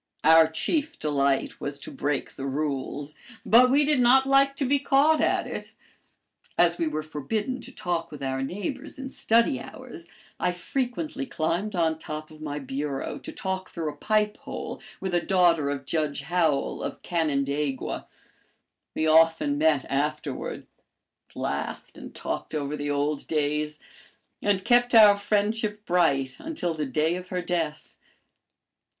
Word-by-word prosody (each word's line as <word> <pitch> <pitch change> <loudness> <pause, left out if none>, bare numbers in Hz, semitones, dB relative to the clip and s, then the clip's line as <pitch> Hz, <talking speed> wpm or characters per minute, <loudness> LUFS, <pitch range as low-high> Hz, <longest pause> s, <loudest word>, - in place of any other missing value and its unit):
"Our 160 +1 +7
chief 290 - -1
delight 140 -2 0
was 140 0 -3
to - - -9
break 145 -1 -2
the 135 - -5
rules, 145 +1 -3 0.3
but 250 +3 +7
we 285 +3 +4
did 295 -2 +2
not 255 +2 +6
like 275 0 +4
to 275 - -1
be 280 +2 +2
caught 285 +3 +4
at - - +2
it. - - -7 0.8
As 175 0 +3
we 165 - +1
were 155 0 -2
forbidden 210 - -3
to - - -10
talk 175 -2 -2
with 145 -2 -8
our 135 0 -1
neighbors 230 - -4
in 270 0 -6
study 235 +3 +2
hours, 240 -10 -10 0.3
I 180 - +1
frequently 265 - -3
climbed 180 +5 -1
on 160 -2 +1
top 155 0 -6
of 155 0 -14
my 145 -1 -4
bureau 135 0 -4
to - - -8
talk 190 -1 -4
through 160 -3 -3
a - - -14
pipe 210 +5 +1
hole - - -7 0.2
with 190 -2 -3
a 175 - +3
daughter 170 -6 +3
of 140 -1 -4
Judge 150 -2 -1
Howell 160 -2 0
of - - -5
Canandaigua. 145 -4 -1 0.9
We 160 - 0
often 160 -2 +4
met 155 -3 +3
afterward, 145 0 -3 0.7
laughed - - -4
and - - -10
talked - - -4
over 145 0 -2
the 145 0 -3
old 145 +1 -1
days, 150 0 -1 0.6
and 200 -2 +1
kept 245 0 +4
our 210 -2 +9
friendship 210 +1 -1
bright 140 -7 +2
until 300 - -3
the 155 -2 -3
day 155 +6 +1
of 180 0 -9
her 180 -1 -2
death. 165 -3 -3
165 Hz, 155 wpm, -26 LUFS, 145-215 Hz, 0.9 s, our